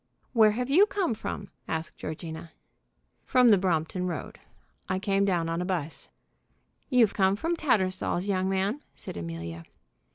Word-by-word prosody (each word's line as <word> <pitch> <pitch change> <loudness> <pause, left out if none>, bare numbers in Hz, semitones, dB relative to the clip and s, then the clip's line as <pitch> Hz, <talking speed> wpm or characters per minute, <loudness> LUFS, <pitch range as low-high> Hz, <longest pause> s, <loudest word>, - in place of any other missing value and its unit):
"Where 220 -3 +6
have 245 +5 -2
you 385 +8 +6
come 390 - 0
from?" 200 -2 -6 0.2
asked 160 0 -3
Georgina. 160 +1 -6 0.7
"From 250 -3 +5
the 205 - +7
Brompton 180 0 0
Road. 165 -6 -5 0.5
I 185 - +1
come 195 0 +1
down 175 -4 +1
on 165 +1 -1
a - - -2
'bus." 170 -5 -3 0.8
"You've 245 -6 +4
come 190 -1 +3
from 330 +11 -1
Tattersall's, 190 - 0
young 190 -1 +1
man!" 195 +8 0
said - - -7
Amelia. 85 0 -6
190 Hz, 150 wpm, -28 LUFS, 165-220 Hz, 0.8 s, the